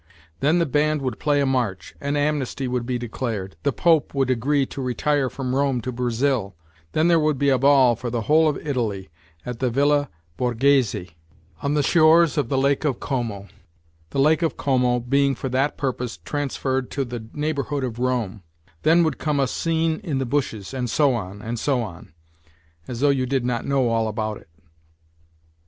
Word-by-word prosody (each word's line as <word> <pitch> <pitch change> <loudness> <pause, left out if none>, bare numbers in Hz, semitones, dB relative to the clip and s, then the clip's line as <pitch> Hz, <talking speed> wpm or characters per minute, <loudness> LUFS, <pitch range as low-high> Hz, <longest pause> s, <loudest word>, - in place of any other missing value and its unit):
Then 150 +5 +3
the 170 - +2
band 150 0 +1
would 125 -4 -3
play 145 -1 +2
a - - +2
march, 125 -8 -1
an 140 +1 -1
amnesty 145 -3 -1
would 125 -1 -2
be 125 -1 -1
declared, 115 -5 -4
the 140 - +1
Pope 160 -1 +2
would 135 -2 +1
agree 135 +3 +1
to 135 - -7
retire 135 +2 0
from 130 0 -4
Rome 135 -2 +1
to 125 - -4
Brazil; 120 -3 -1 0.4
then 155 +2 +3
th<>r<> 170 -2 +4
would 150 -2 +1
be 140 +1 +2
a 130 -2 +3
ball 135 -3 +5
for 120 +2 -5
the 120 0 -2
whole 155 +7 +4
of 150 - -2
Italy 110 - -2 0.4
at 125 -2 -5
the 130 - +1
Villa 145 +3 +2 0.3
Borghese 120 -6 +1 0.5
on 140 +1 0
the 145 - +2
shores 165 +2 +5
of 145 -6 0
the 135 - 0
Lake 140 +2 +2
of 140 -6 0
Como, 115 -7 -3 0.6
the - - -6
Lake 155 +5 +4
of 165 - -1
Como 125 -3 +2
being 135 +3 +1
for 130 - -4
that 135 +3 0
purpose 125 -3 -3
transferred 135 -3 -2
to 140 -1 -2
the 120 -2 -7
neighbourhood 145 -2 -2
of 120 -2 -4
Rome; 120 -6 -1 0.4
then 165 +2 +4
would 160 - -1
come 150 -2 0
a 135 - +3
scene 160 +3 0
in 155 -8 -2
the 135 - -1
bushes, 120 -5 -2
and 125 -2 -2
so 140 +3 +3
on, 100 -2 -5
and 115 +1 -4
so 135 +1 +1
on 85 -9 -10 0.8
as 125 -1 -5
though 145 - +4
you 130 -2 0
did 130 -1 0
not 125 -2 -2
know 135 -3 +2
all 115 -1 +1
about 110 -1 -3
it - - -18
130 Hz, 190 wpm, -23 LUFS, 120-145 Hz, 0.8 s, ball